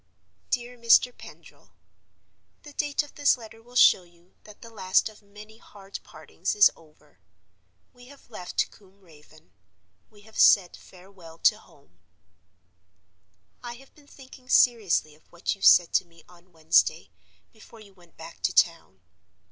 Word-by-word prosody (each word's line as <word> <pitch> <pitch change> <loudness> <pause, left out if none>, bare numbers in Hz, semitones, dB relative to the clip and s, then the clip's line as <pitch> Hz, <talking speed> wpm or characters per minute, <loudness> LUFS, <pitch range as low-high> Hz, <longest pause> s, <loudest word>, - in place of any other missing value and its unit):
"DEAR 245 -1 -4
MR. 235 +1 +4
PENDRIL,— - - -17 0.9
"The 295 -2 -13
date 290 0 -2
of 295 - -16
this 285 -2 +2
letter 225 -1 -14
will 245 +2 -20
show 220 - +5
you 175 0 -25
that 210 -1 -16
the 230 - -13
last 190 -1 0
of 215 0 -19
many 210 +2 -16
hard 200 -3 -12
partings - - -6
is 415 0 +6
over. 155 -2 -25 0.7
We 245 0 -18
have 280 +1 -18
left 185 -6 -4
Combe 200 -1 -23
Raven; 155 -2 -21 0.6
we 205 - -21
have 220 +1 -12
said 185 -4 +4
farewell 180 -3 -17
to - - +3
home. 85 +2 -25 1.6
"I 240 - -8
have 265 +3 -18
been 290 -2 -23
thinking 260 -2 -17
seriously 210 -13 +2
of 155 - -27
what 170 +1 -3
you 195 - -16
said 175 -3 +5
to - - +1
me 165 -1 -22
on 180 +1 -22
Wednesday, 100 - +1 0.4
before 225 +1 -17
you 205 -2 -17
went 175 -3 -24
back - - -13
to - - 0
town. 95 +1 0
200 Hz, 155 wpm, -25 LUFS, 175-240 Hz, 1.6 s, is